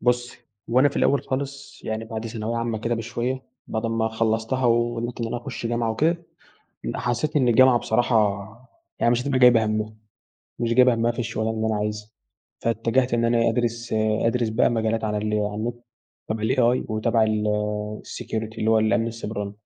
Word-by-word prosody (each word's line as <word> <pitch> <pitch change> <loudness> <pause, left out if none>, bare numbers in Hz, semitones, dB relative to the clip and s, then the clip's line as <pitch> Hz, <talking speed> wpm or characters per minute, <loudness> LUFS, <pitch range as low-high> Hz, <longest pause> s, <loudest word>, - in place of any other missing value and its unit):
بُصّي، 125 0 0 0.3
هو 125 +2 +4
أنا 145 - +6
في 140 - -8
الأوّل 140 - +3
خالص 140 +1 -5
يعني 110 0 -3
بعد 110 0 -5
ثانوية 115 +1 -3
عامة 115 -1 -1
كده 115 +2 -1
بشوية، 120 +3 -3 0.3
بعد 110 0 -3
أما 115 -1 0
خلصتها 110 +3 0
وقدرت 120 0 +1
إن 115 - -1
أنا 120 +2 -3
أخش 120 -1 -5
جامعة 115 -1 0
وكده، 155 +10 +2 0.7
ال - - -3
حسّيت 150 +6 -1
إن 130 -4 +3
الجامعة 125 +1 +6
بصراحة، 110 -4 +1 0.5
يعني 120 - +3
مش 120 - +1
هتبقى 135 -1 0
جايبة 120 -3 +6
هَمّها 110 0 -2 0.6
مش 115 -1 0
جايبة 125 0 +6
هَمّها 115 +1 +1
في - - -13
الشغلانة 110 -1 -1
اللي 110 - -1
أنا 110 -1 0
عايزها. 105 0 -3 0.5
فاتجهت 115 +2 +1
إن 115 0 +1
أنا 115 0 +3
أدرس 120 0 -2 0.3
أدرس 115 0 +1
بقى 110 +4 +2
مجالات 115 -1 0
على 105 -1 -1
ال 105 +1 -1
على 105 -1 -1
النت 115 +3 -2 0.5
تبع 110 0 -2
الAI 125 +1 +2
وتبع 110 +1 +2
الsecurity 105 +1 -3
اللي 110 - +1
هو 110 - +5
الأمن 110 +1 +2
السيبراني. 105 -3 -4
115 Hz, 175 wpm, -24 LUFS, 110-120 Hz, 0.7 s, أنا